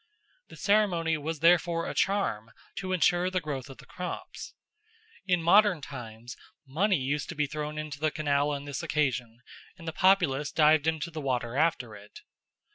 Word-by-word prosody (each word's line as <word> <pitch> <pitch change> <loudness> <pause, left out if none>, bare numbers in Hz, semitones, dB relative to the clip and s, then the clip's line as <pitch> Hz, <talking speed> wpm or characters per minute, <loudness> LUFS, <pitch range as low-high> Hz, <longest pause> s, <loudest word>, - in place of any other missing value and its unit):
The - - -13
ceremony 195 -6 +2
was 155 +1 -4
therefore 170 0 +3
a - - -4
charm 195 - 0 0.3
to 185 0 -4
ensure 180 0 +2
the 185 0 0
growth 145 -4 -5
of 135 - -11
the - - -14
crops. 180 0 -7 0.7
In 180 -3 +2
modern 195 0 +5
times 120 -4 -9 0.3
money 180 +8 +1
used 140 +2 -2
to - - -5
be 150 - +1
thrown 150 +1 -5
into 155 -2 -5
the 155 +1 +1
canal 145 -1 0
on 145 -1 -4
this 140 -2 -4
occasion, 125 -5 -1 0.4
and 165 -2 -12
the 160 - -3
populace 170 -7 +2
dived 155 -1 +4
into 160 0 -1
the 155 -1 -6
water 125 -3 -2
after 140 -7 0
it. 105 +1 -14
155 Hz, 170 wpm, -28 LUFS, 140-175 Hz, 0.7 s, modern